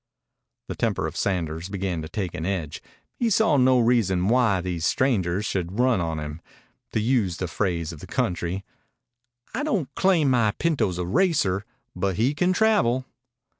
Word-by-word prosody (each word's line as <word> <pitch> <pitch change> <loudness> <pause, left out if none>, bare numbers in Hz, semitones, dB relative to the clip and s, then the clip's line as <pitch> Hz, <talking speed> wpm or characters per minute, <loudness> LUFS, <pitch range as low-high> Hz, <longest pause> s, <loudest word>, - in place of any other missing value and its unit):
The - - -4
temper - - -1
of - - -5
Sanders 85 -2 -2
began 95 -4 -2
to 80 - -7
take 95 -1 -3
an 80 - -5
edge. 85 -5 -3 0.3
He 235 - 0
saw 215 -8 +3
no 130 -1 +5
reason 105 -6 +2
why 115 -6 +3
these 90 -2 -3
strangers 100 -4 +1
should 95 0 -3
run 125 -4 +3
on 80 -1 -2
him, 75 +1 -6 0.5
to - - +1
use 110 -7 +1
the 95 - -3
phrase 85 -2 -2
of 80 - -11
the - - -10
country. 90 +2 -2 0.9
"I 245 - -2
don't 195 - -1
claim 170 -8 +3
my 115 -4 +3
pinto's 145 - 0
a 90 - -2
racer, 110 - +1 0.3
but 95 +1 -1
he 120 +8 +2
can 180 +4 +1
travel." 135 - +2
100 Hz, 170 wpm, -25 LUFS, 90-130 Hz, 0.9 s, no